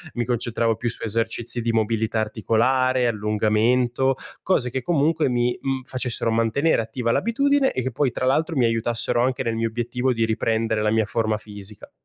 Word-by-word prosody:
mi 120 - -1
concentravo 115 -1 0
più 120 +2 -2
su 115 - -3
esercizi 115 +2 -1
di 115 0 0
mobilità 110 0 0
articolare, 125 +4 +1
allungamento, 115 +4 +1 0.3
cose 140 -10 +1
che 130 +1 -3
comunque 155 +1 +1
mi, 120 0 0
mhmm, 135 -1 -2
facessero 125 -2 -1
mantenere 115 +8 +2
attiva 115 +1 -2
l'abitudine, 275 - +2
e 130 - -2
che 130 - -2
poi 135 +3 +1
tra 130 - -3
l'altro 160 +5 +1
mi 125 - +3
aiutassero 115 +1 0
anche 130 0 0
nel 115 - -1
mio 115 0 -1
obiettivo 120 +3 -1
di 115 -1 +1
riprendere 110 0 0
la 105 - +1
mia 110 0 +2
forma 110 +1 -1
fisica. 105 -1 -11
120 Hz, 175 wpm, -23 LUFS, 110-130 Hz, 0.3 s, mi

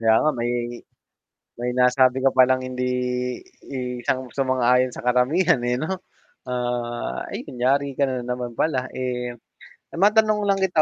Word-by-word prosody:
Kaya 110 -1 +4
nga, 155 - +3
may 120 -3 -2 1.1
may 125 0 -1
nasabi 130 +1 +3
ko 135 - +4
palang 130 0 +4
hindi 125 0 -2 0.8
i 125 -2 -4
sang 130 -1 -2
sumang-ayon 130 -1 +2
sa 120 - -9
karamihan, 135 +6 +3
eh, 120 0 0
'no. 155 +8 -2 0.6
Ah, 120 -1 -3
'yun, 125 - -8
yari 140 +2 +2
ka 140 +1 +1
na 130 -2 -3
naman 125 -1 -4
pala, 130 -5 0
eh 125 -1 -3 0.6
matanong 210 +3 +3
lang 195 - +3
kita 185 -4 +2
130 Hz, 145 wpm, -23 LUFS, 125-140 Hz, 1.1 s, Kaya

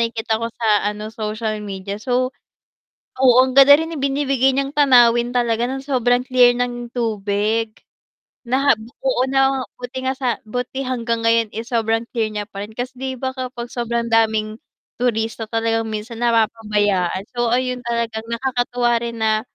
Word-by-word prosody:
nakikita 225 -1 -2
ko 230 - -1
sa 230 -1 -3 0.2
ano, 210 0 -5
social 215 -1 -3
media, 200 0 -6
so 255 +2 0 0.9
oo 255 -2 +5
ang 260 +1 -2
ganda 275 +1 +9
rin 325 +1 -3
ibinibigay 270 -1 +1
niyang 275 +1 -1
tanawin 240 -3 +5
talaga, 235 -1 +1
nang 265 +1 -4
sobrang 250 -3 +1
clear 250 -1 +4
ng 240 -1 -3
tubig 215 -1 -1 0.6
na 265 +3 +2 0.3
oo 255 -1 +2
na 270 0 +2 0.2
buti 250 +1 -6
nga 265 - -3
sa 250 -3 -1
buti 250 +4 -4
hanggang 235 -3 -2
ngayon, 230 -1 +2
eh, 225 - -3
sobrang 230 -1 -1
clear 220 -2 -2
niya 210 0 -5
pa 200 0 -6
rin 215 - -15
kasi 250 +2 -5
'di 265 0 -4
ba 260 - 0
kapag 245 -2 -5
sobrang 235 -1 -2
daming 220 -1 +1 0.4
turista 225 -2 -1
talagang 225 0 0
minsan 220 +2 -6
napapabayaan. 210 -5 +1
So, 240 -1 0
ayun 250 +1 0
talagang 235 -2 -2
nakakatuwa 245 -1 0
rin 235 -1 -5
na 220 -1 +1
235 Hz, 155 wpm, -20 LUFS, 220-255 Hz, 0.9 s, ganda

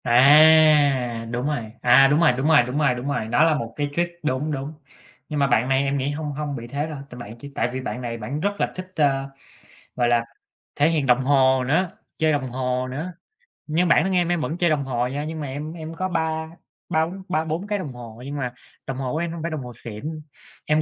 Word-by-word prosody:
À, 140 -2 +5
đúng 125 +2 -2
rồi, 120 -8 -3
à, 130 +3 +7
đúng 145 +3 +3
rồi, 170 -6 +5
đúng 135 +4 -1
rồi, 155 -5 +6
đúng 125 +3 -4
rồi, 140 -5 +2
đúng 125 +2 -5
rồi, 125 -6 -1
đó 135 +7 +3
là 165 -1 +4
một 115 -5 -4
cái 145 -1 -2
trick 175 0 -2
đúng, 150 +2 -1
đúng. 140 +1 -4 0.6
Nhưng 150 -2 -2
mà 140 - +3
bạn 125 -1 +2
này 135 +1 +3
em 140 0 0
nghĩ 135 +1 -1
hông 150 0 -4
hông 145 0 -4
bị 120 -2 -7
thế 140 +5 -3
đâu, 155 -2 -6
tại 125 - -10
bạn 115 -1 -9
chỉ 140 +4 -10
tại - - 0
vì 130 - -3
bạn 125 - -5
này 120 -1 -4
bạn 115 +7 -4
rất 200 +5 +1
là - - 0
thích, 185 0 -8
ơ, 135 -3 +1 0.7
gọi 120 -1 +2
là, 120 -1 +4 0.6
thể 145 +2 +4
hiện 155 -4 0
đồng 125 +1 +3
hồ 130 -2 +4
nữa, 165 +7 +1 0.3
chơi 155 0 +2
đồng 140 -3 -1
hồ 125 0 -2
nữa. 155 +8 -5 0.6
Nhưng 165 +4 +1
bản 165 - +5
thân 190 - -1
em 175 -1 +2
em 175 -2 +1
vẫn 160 +2 -3
chơi 175 -1 +2
đồng 150 -2 +1
hồ 125 -2 -1
nha, 145 +3 -4
nhưng 160 +1 -5
mà 145 - -4
em 145 +4 -5
em 165 -1 -7
có 185 +2 -2
ba 160 -2 -1 0.4
ba 160 0 +2
bốn 190 +3 -8
ba 160 -3 0
bốn 160 +5 -3
cái 205 -1 -1
đồng 145 -8 -6
hồ, 120 -1 -10
nhưng 145 +1 -5
mà 125 -3 -3 0.3
đồng 135 - -4
hồ 130 -2 -3
của - - -1
em 170 0 -2
hông 170 - -6
phải 165 +1 -3
đồng 155 -3 -3
hồ 125 - -8
xịn, 145 +8 -7 0.4
em 150 +1 +2
145 Hz, 255 wpm, -23 LUFS, 125-160 Hz, 0.7 s, à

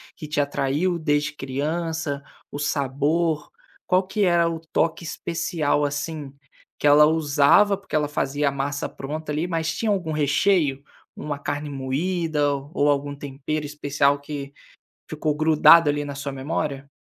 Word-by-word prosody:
que - - -8
te 150 0 -2
atraiu 145 +5 0
desde 150 -2 0
criança, 150 +2 -3 0.3
o 145 - -6
sabor, 150 +3 0 0.4
qual 185 +1 +3
que 205 +2 0
era 170 -2 +3
o 165 -1 -5
toque 165 +1 0
especial, 160 -3 -1
assim, 145 0 -3 0.5
que - - -3
ela 150 +1 +7
usava, 155 +6 +4
porque 195 -4 -7
ela 150 -1 +2
fazia 145 0 -1
a - - -3
massa 140 +1 -2
pronta 150 +3 -6
ali, 155 +4 -1
mas 165 -2 -1
tinha 220 +3 0
algum 180 -5 -1
recheio, 150 -1 +2 0.3
uma 145 -1 -5
carne 145 +1 -3
moída 145 +2 -1 0.2
ou 145 +1 +2
algum 145 0 -2
tempero 145 +2 -4
especial, 145 -1 +1
que 140 -1 -7 0.6
ficou 155 -1 -1
grudado 155 +1 +6
ali 145 0 -2
na 145 -1 -6
sua 140 0 -4
memória? 140 0 -3
150 Hz, 150 wpm, -23 LUFS, 145-160 Hz, 0.6 s, ela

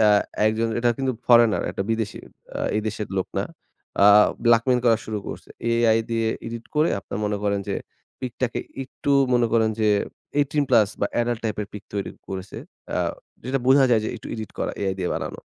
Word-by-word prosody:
অ্যা 105 -1 +6 0.3
একজন 110 +1 +1
এটা 120 0 +3
কিন্তু 130 -1 0
ফরেনার 120 -3 +5
একটা - - -3
বিদেশী 110 -2 -2 0.4
আ - - -3 0.2
এই 110 - +2
দেশের 105 -1 -3
লোক 95 - -1
না। - - 0 0.6
আ - - +8 0.4
blackmail 120 +2 +4
করা 115 -2 +5
শুরু 110 -1 -3
করসে। - - -8 0.2
AI 115 -1 +4
দিয়ে 115 -1 +1 0.2
এডিট 115 0 -6
করে 155 +2 +4
আপনারা 100 - -6
মনে 105 0 -1
করেন 100 -1 +1
যে 100 - 0 0.5
পিকটাকে 125 -1 -2 0.2
একটু 135 +2 -5 0.2
মনে 120 -1 +3
করেন 110 -1 +3
যে 110 - +3 0.5
18+ 135 -7 +3
বা 100 - +2
এডাল্ট 120 -1 -1
টাইপের 105 -1 -2
পিক 105 -1 -8
তৈরি 100 -1 -2 0.2
করেছে। 95 0 -6 0.4
আ - - 0 0.5
যেটা 130 +2 0
বোঝা 135 +1 +6
যায় 115 -2 +4
যে - - -1
একটু 115 - -10
এডিট 110 -2 -6
করা - - -1
AI 95 -1 +1
দিয়ে 90 - -1
বানানো। - - -4
115 Hz, 185 wpm, -24 LUFS, 105-120 Hz, 0.6 s, আ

